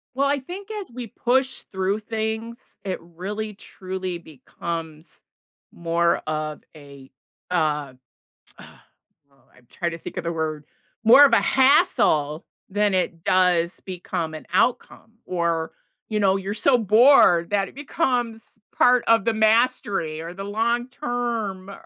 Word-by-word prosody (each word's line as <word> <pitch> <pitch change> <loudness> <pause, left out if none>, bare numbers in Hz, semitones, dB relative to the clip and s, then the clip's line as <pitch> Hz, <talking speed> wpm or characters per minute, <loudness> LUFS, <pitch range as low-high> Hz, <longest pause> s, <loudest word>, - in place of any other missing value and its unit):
Well, 280 +1 +2
I 285 0 +1
think 370 +10 -9
as 410 - -6
we 245 -2 -6
push 255 +3 0
through 190 +2 -1
things, 220 +2 -4 0.3
it 190 -2 -3
really, 200 +6 -6
truly 185 -2 -6
becomes 160 +2 -8 0.5
more 170 0 +1
of 155 0 -3
a, 140 -2 -14 0.4
uh, 150 -6 0 0.7
ugh - - -11 0.7
oh, - - -28 0.2
I'm 125 0 -23
trying 170 -1 -3
to 165 - -6
think - - -9
of - - -3
the 170 - -1
word, 155 -2 -3 0.4
more 270 +6 +9
of - - +2
a - - +7
hassle 260 - +3 0.2
than 205 0 +1
it 170 -3 -1
does 180 -2 +2
become 175 -3 -5
an - - -9
outcome, 225 -2 0
or, 170 -2 -1 0.4
you 215 -1 -1
know, 195 -1 +3
you're 195 +1 -3
so 250 +4 +3
bored 215 -5 +5
that 200 -1 0
it - - -14
becomes 250 -6 -1 0.4
part 250 0 +5
of 230 -2 +4
the 230 - +2
mastery, 215 -7 +1
or 170 +2 -7
the 195 - -6
long 235 +4 -1
term 235 -8 -3
195 Hz, 145 wpm, -23 LUFS, 170-235 Hz, 0.7 s, more